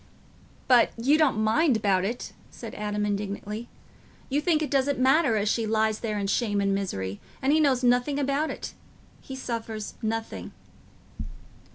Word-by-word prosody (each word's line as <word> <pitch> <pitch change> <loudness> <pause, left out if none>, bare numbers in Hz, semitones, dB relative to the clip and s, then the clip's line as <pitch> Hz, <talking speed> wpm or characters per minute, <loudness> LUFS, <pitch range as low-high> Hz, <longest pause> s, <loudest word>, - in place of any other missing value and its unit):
"But 245 -3 +5
you 260 +6 +3
don't 305 -7 +3
mind 230 +5 +3
about 195 -3 +1
it," 230 +5 -4 0.2
said 230 -2 -9
Adam 210 0 -2
indignantly. 205 +2 -4 0.6
"You 285 +2 +1
think 315 -1 +2
it 295 - -4
doesn't 280 0 +2
matter 265 -1 +3
as 205 0 0
she 225 +1 +1
lies 220 0 +1
there 215 -2 -2
in 200 - -1
shame 205 0 0
and 200 0 +1
misery, 100 - -3 0.2
and 275 +2 +2
he 315 - +4
knows 270 -4 +2
nothing 245 +3 +2
about 285 +2 0
it—he 265 - -10
suffers 225 -4 -5
nothing." 225 0 -4
230 Hz, 155 wpm, -26 LUFS, 210-275 Hz, 0.6 s, But